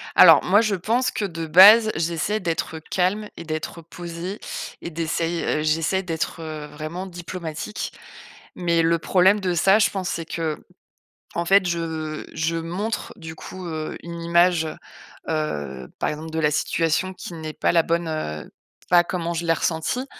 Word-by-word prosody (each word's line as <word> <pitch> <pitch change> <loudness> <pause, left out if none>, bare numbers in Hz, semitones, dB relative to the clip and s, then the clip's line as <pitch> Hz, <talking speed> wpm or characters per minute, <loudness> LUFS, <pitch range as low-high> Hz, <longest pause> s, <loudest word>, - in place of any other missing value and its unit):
Alors - - +8
moi, 200 +4 +5
je 215 -3 +1
pense 235 +8 0
que 210 - -2
de 165 -3 -5
base, 210 +7 +8
j'essaie 170 +6 -1
d'être 165 -3 -2
calme 190 +6 -1
et - - -7
d'être 155 +1 -5
posée 170 +4 -7 0.4
et - - -5
d'essaye 165 +1 -2
heu, 155 - 0
j'essaie 165 +5 +1
d'être, 165 -1 -3
heu, 155 -2 -6
vraiment 155 +5 -6
diplomatique. 175 +1 -6 0.6
Mais 170 -2 +1
le 165 +1 +3
problème 190 +5 +4
de 185 -3 -1
ça, 195 +5 +4
je 220 - +4
pense, 185 -3 -3
c'est 165 - -3
qu'en 160 -2 -5 0.7
fait 195 +1 +5
je 160 -2 -3
je 165 +1 -1
montre 180 +7 -3
du 160 -4 -8
coup, 185 +3 -9
heu, 155 -1 -4
une 170 0 -7
image, 170 -1 +3 0.6
heu, 75 - -3
par - - 0
exemple 155 +1 -6
de 160 - -2
la 150 -1 +2
situation, 165 +5 0
qui 180 - -9
n'est 160 -2 -6
pas - - +1
la 170 -1 +4
bonne 170 +1 0
heu, 75 - -4 0.4
pas 175 -1 +6
comment 170 -1 -3
je 170 0 -3
l'ai 165 - +5
ressentie 165 +11 -1
170 Hz, 165 wpm, -23 LUFS, 160-185 Hz, 0.7 s, Alors